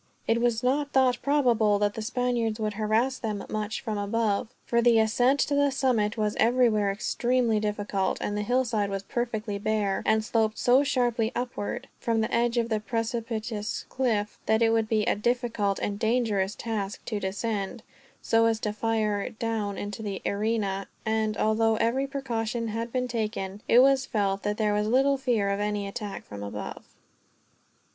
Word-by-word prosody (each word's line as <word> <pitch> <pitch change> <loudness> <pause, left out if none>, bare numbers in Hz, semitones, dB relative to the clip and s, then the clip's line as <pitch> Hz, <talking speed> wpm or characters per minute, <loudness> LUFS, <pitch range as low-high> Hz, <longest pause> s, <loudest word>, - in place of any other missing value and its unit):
It 230 +1 +2
was 240 -1 +1
not 285 +3 0
thought 255 -2 +3
probable 240 -8 +3
that 205 0 +1
the 220 - -5
Spaniards 235 -1 -1
would 215 -1 -1
harass 220 +5 0
them 215 -3 -3
much 215 +1 -3
from 215 -4 -3
above, 205 0 0 0.2
for 235 0 +2
the 235 -1 +5
ascent 245 +5 +3
to 290 - 0
the 285 0 +3
summit 245 -6 +1
was 210 -1 0
everywhere 225 -4 +3
extremely 235 +2 +1
difficult; 205 -2 -1
and 205 - -2
the 210 - -1
hillside 230 -2 +1
was 195 0 -3
perfectly 220 -2 -3
bare, 205 -2 0
and 220 0 +3
sloped 220 -1 +1
so 255 +3 +4
sharply 240 -4 +1
upward, 245 -4 -3
from 230 -1 0
the 220 - -2
edge 235 +1 +2
of 235 -1 +1
the 220 -2 +1
precipitous 225 -1 -3
cliff, 220 -5 -1
that 220 +1 +3
it 225 - +4
would 225 -1 +1
be 215 -1 +2
a 240 - +2
difficult 230 -3 0
and 205 0 -3
dangerous 220 -4 +1
task 210 -3 -4
to 215 -3 -2
descend, 200 +1 -3 0.4
so 225 0 +3
as 225 -1 +1
to 210 - -1
fire 215 -2 0
down 220 -3 -3
into 205 +1 -5
the 200 -3 -4
arena; 200 -2 -1 0.2
and, 220 -1 0
although 220 +1 +2
every 250 +5 +1
precaution 235 -4 -3
had 230 +2 -3
been 250 0 -1
taken, 215 -4 -3
it 235 - +5
was 270 0 +3
felt 200 -2 0
that 210 0 -2
there 210 -2 +1
was 210 0 +1
little 270 +4 +3
fear 230 -7 +1
of 200 - -1
any 205 -1 -1
attack 200 0 -6
from 105 -1 -8
above. 100 +1 -6
220 Hz, 175 wpm, -27 LUFS, 210-240 Hz, 0.4 s, the